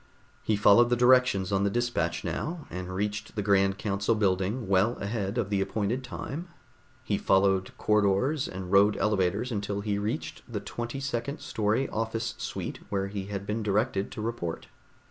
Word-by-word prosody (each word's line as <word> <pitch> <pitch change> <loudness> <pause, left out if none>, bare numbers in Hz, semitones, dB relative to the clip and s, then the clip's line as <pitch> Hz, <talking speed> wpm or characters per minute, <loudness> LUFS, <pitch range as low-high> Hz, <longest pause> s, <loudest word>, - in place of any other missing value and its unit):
He 110 - +1
followed 110 +3 +6
the 120 - +3
directions 125 -6 +4
on 100 0 +2
the 100 - +2
dispatch 120 +3 -1
now, 160 -1 -3
and 90 0 -5
reached 105 +2 -3
the 105 - -1
grand 95 -1 +3
council 100 +2 0
building 100 +3 0
well 100 +5 +3
ahead 100 0 -3
of 105 -4 -1
the 100 -1 +2
appointed 110 +6 -1
time. 140 +6 -6 0.6
He - - -1
followed 95 -1 +3
corridors 105 +8 +2
and 95 0 -6
rode 100 +1 +5
elevators 105 +3 +1
until 100 -2 -2
he 100 -1 -1
reached 105 +2 -3
the - - -2
twenty 120 +3 -5
second 140 +1 -3
story 110 +5 0
office 110 0 -2
suite - - -4
where 100 -1 -1
he 100 -1 -4
had 100 -1 -4
been 105 +2 -2
directed 105 0 0
to - - -5
report. 110 -8 -4
105 Hz, 165 wpm, -28 LUFS, 100-120 Hz, 0.6 s, followed